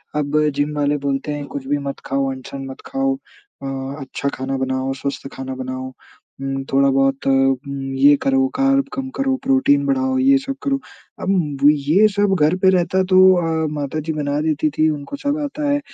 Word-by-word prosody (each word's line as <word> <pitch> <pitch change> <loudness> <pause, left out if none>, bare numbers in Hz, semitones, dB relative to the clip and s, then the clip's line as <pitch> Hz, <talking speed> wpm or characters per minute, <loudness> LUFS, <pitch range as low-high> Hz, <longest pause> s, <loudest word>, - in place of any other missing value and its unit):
अब 150 0 +1 0.2
जिम 145 +1 -1
वाले 145 0 +1
बोलते 135 +2 -1
हैं, 145 -1 -5
कुछ 140 -1 -7
भी 145 +1 +1
मत 140 - -5
खाओ 135 0 0
अंट-शंट 135 +1 -7
मत 130 - -10
खाओ, 270 0 0
अ, 135 - -8
अच्छा 135 +1 -3
खाना 135 +1 -3
बनाओ, 130 0 -1
स्वस्थ 135 0 -5
खाना 130 0 -6
बनाओ। 130 0 -5 0.5
उम, 135 0 -3
थोड़ा-बहुत 135 0 +2
उम, 135 0 +3 0.4
ये 140 +2 +6
करो 270 0 +3
कार्ब 275 +1 +2
कम 265 0 -4
करो, 270 -1 +1
प्रोटीन 275 +2 +3
बढ़ाओ, 265 -1 +1
ये 275 +1 +5
सब 275 0 -4
करो, 275 -1 0 0.4
अब 170 -7 0
ये 150 +8 +3
सब 205 -1 +2
घर 155 +3 +3
पे 190 - +7
रहता 185 0 +2
तो 185 - +7 0.2
अ, 160 -2 0
माताजी 150 +2 -3
बना 145 -1 -1
देती 155 -1 0
थी 155 0 +4
उनको 150 - -4
सब 285 +1 0
आता 290 +1 -3
है। 285 0 +2
150 Hz, 180 wpm, -20 LUFS, -, 0.5 s, पे